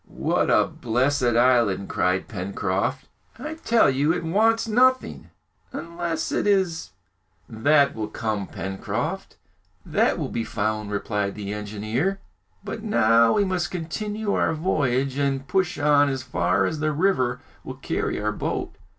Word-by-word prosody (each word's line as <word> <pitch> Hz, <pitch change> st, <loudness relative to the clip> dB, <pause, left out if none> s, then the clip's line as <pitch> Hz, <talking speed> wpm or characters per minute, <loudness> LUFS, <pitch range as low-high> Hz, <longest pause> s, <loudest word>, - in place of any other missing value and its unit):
What -, -, 0 dB
a -, -, +4 dB
blessed 125 Hz, +1 st, 0 dB
island!" 120 Hz, -6 st, +3 dB
cried 90 Hz, +1 st, 0 dB
Pencroft. 100 Hz, +5 st, -2 dB, 0.3 s
"I 305 Hz, +6 st, -5 dB
tell 235 Hz, -8 st, +3 dB
you, 140 Hz, +4 st, +2 dB
it 175 Hz, 0 st, -2 dB
wants 220 Hz, +7 st, +2 dB
nothing 255 Hz, +3 st, +2 dB, 0.4 s
unless 170 Hz, -1 st, -4 dB
it -, -, 0 dB
is 185 Hz, -, +1 dB, 0.3 s
" 85 Hz, -2 st, -42 dB, 0.2 s
"That 145 Hz, -3 st, +5 dB
will 110 Hz, -1 st, -4 dB
come, 105 Hz, -2 st, -3 dB
Pencroft, 95 Hz, 0 st, -4 dB, 0.5 s
that -, -, +1 dB
will -, -, -3 dB
be 115 Hz, -, -2 dB
found," 110 Hz, -1 st, -2 dB
replied 105 Hz, -1 st, -2 dB
the 105 Hz, -1 st, -5 dB
engineer; 110 Hz, -, -2 dB, 0.4 s
"but 205 Hz, +2 st, -6 dB
now 115 Hz, -, +4 dB
we 205 Hz, -, +2 dB
must 180 Hz, -3 st, -1 dB
continue 205 Hz, +5 st, -3 dB
our -, -, +1 dB
voyage 140 Hz, -5 st, 0 dB
and 135 Hz, -1 st, -1 dB
push 190 Hz, -2 st, 0 dB
on 145 Hz, -1 st, +4 dB
as 135 Hz, -1 st, -3 dB
far 90 Hz, -9 st, +1 dB
as 155 Hz, -, -2 dB
the 155 Hz, 0 st, 0 dB
river 145 Hz, -7 st, +1 dB, 0.2 s
will -, -, -7 dB
carry -, -, -2 dB
our 105 Hz, +1 st, -1 dB
boat!" -, -, -4 dB
135 Hz, 145 wpm, -24 LUFS, 110-175 Hz, 0.5 s, That